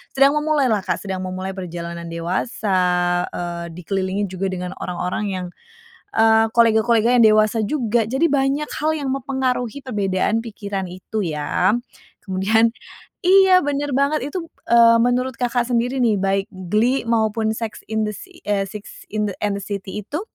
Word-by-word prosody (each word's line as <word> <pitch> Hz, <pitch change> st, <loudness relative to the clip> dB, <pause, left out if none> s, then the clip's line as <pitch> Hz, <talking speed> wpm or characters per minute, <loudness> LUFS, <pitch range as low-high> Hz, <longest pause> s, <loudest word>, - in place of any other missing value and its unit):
sedang 275 Hz, +1 st, +6 dB
memulailah 280 Hz, -9 st, +1 dB
Kak, -, -, -2 dB
sedang 190 Hz, -2 st, -4 dB
memulai 185 Hz, +1 st, -4 dB
perjalanan 170 Hz, -2 st, -6 dB
dewasa, 185 Hz, +4 st, -1 dB, 0.5 s
eee, 170 Hz, -1 st, -5 dB
dikelilingi 190 Hz, +3 st, -2 dB
juga 190 Hz, +1 st, -2 dB
dengan 180 Hz, -1 st, -4 dB
orang-orang 180 Hz, +4 st, -3 dB
yang, 185 Hz, -1 st, -3 dB, 0.7 s
eee, 225 Hz, 0 st, +5 dB
kolega-koleganya 230 Hz, +1 st, +4 dB
yang -, -, +8 dB
dewasa 215 Hz, +1 st, +3 dB
juga. 235 Hz, -1 st, +1 dB
Jadi 265 Hz, +7 st, +2 dB
banyak 280 Hz, 0 st, 0 dB
hal 310 Hz, -, +2 dB
yang 275 Hz, -3 st, -2 dB
mempengaruhi 260 Hz, -1 st, -2 dB
perbedaan 205 Hz, -2 st, 0 dB
pikiran 200 Hz, -4 st, -5 dB
itu 195 Hz, +4 st, -4 dB
ya. 160 Hz, +5 st, +1 dB, 0.5 s
Kemudian 210 Hz, +5 st, +3 dB, 0.6 s
iya 380 Hz, 0 st, +6 dB
bener 290 Hz, 0 st, -1 dB
banget 280 Hz, +2 st, +2 dB
itu, 345 Hz, -1 st, -4 dB, 0.2 s
eee, 230 Hz, 0 st, +7 dB
menurut 250 Hz, +2 st, +1 dB
Kakak 245 Hz, -1 st, 0 dB
sendiri 245 Hz, +2 st, 0 dB
nih, 220 Hz, -6 st, +2 dB
baik 195 Hz, 0 st, 0 dB
Glee 210 Hz, +8 st, 0 dB
maupun 220 Hz, -1 st, +1 dB
sex 225 Hz, -2 st, -5 dB
in 220 Hz, 0 st, 0 dB
the 210 Hz, -, -3 dB
si 370 Hz, -, -12 dB
eee, 200 Hz, -2 st, 0 dB
Six 210 Hz, 0 st, -11 dB
in 210 Hz, -1 st, -1 dB
and 205 Hz, -1 st, 0 dB
the 200 Hz, -, -8 dB
city 200 Hz, 0 st, -5 dB
itu, 305 Hz, -, -4 dB
220 Hz, 150 wpm, -21 LUFS, 190-250 Hz, 0.7 s, yang